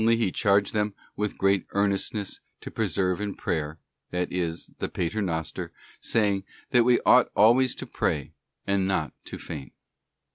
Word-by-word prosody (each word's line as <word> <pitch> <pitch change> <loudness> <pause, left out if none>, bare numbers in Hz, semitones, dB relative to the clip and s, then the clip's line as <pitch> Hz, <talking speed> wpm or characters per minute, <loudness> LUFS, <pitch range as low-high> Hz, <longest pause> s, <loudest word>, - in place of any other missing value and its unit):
He 115 -3 +3
charged 100 0 +2
them 105 -2 0 0.2
with 105 0 -2
great 95 -1 +2
earnestness 100 +1 -1 0.2
to - - -7
persevere 90 0 0
in 105 -1 -3
prayer—that 80 +3 -4
is, 85 -2 -2
the - - -2
Pater 100 +6 -2
Noster—saying, 95 +3 -2 0.3
'that 125 -2 +6
we 120 0 +4
ought 125 0 +6
always 120 +4 +5
to - - -6
pray, 75 -3 -1 0.3
and 100 -1 +1
not 90 -5 0
to - - -6
faint. 70 -6 -8
100 Hz, 140 wpm, -27 LUFS, 90-105 Hz, 0.3 s, that